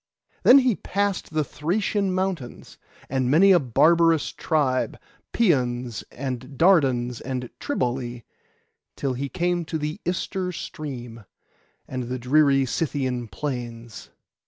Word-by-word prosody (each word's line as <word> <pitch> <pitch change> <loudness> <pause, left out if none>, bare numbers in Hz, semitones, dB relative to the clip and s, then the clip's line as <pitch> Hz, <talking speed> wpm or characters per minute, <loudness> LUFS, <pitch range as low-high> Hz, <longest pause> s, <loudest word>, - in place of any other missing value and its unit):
Then 260 - +8
he 255 -5 +3
passed 200 +1 -2
the 155 -1 +1
Thracian 190 +7 -1
mountains, 185 -9 -4 0.3
and 130 -1 0
many 180 +8 +6
a 180 - +6
barbarous 160 +5 +3
tribe, 140 -6 0 0.3
Pæons 125 - +1
and 130 0 -6
Dardans 130 -9 +3
and 125 -1 -4
Triballi, 120 -1 -2 0.7
till 135 -2 -2
he 135 +2 -4
came 175 +1 0
to 160 - -3
the 155 +6 -4
Ister 180 +1 -2
stream, 120 - -7 0.6
and 130 -1 -4
the 125 +2 -3
dreary 135 +2 +3
Scythian 130 -4 -2
plains. 120 -1 -6
140 Hz, 115 wpm, -24 LUFS, 125-170 Hz, 0.7 s, Then